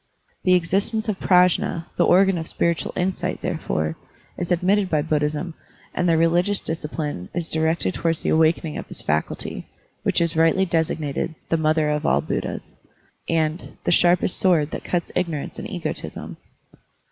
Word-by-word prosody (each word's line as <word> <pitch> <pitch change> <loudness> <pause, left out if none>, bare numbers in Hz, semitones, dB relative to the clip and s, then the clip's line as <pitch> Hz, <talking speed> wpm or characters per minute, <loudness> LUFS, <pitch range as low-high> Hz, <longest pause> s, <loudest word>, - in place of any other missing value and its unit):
The 185 -1 +4
existence 195 +6 0
of 210 -3 -2
Prajfi^, 180 -2 +3
the - - +3
organ 190 0 +4
of 160 - -5
spiritual 170 -1 0
insight, 180 0 -1
therefore, 80 - -2 0.4
is 175 0 -4
admitted 185 +3 +2
by 155 -3 +1
Buddhism, 150 +3 -1 0.4
and 180 - +1
their 165 - +4
religious 175 +5 +2
disci 155 -2 -4
pline 145 - -4
is 170 -2 -2
directed 160 - +1
towards 165 -1 -1
the - - 0
awakening 160 0 +2
of - - -8
this - - -4
faculty, 75 +1 -2 0.3
which - - +1
is 170 -1 +2
rightly 165 +4 +4
designated 160 -2 -1
"the 165 - +2
mother 155 -1 +2
of 150 0 -1
all 70 - +3
Buddhas," 70 - -4 0.5
and 160 +1 -1
"the - - +1
sharpest 175 +1 +3
sword 160 -5 +3
that - - -5
cuts 175 -2 -2
ignorance 165 -5 -2
and - - -6
egotism." - - -5
165 Hz, 160 wpm, -23 LUFS, 155-180 Hz, 0.5 s, The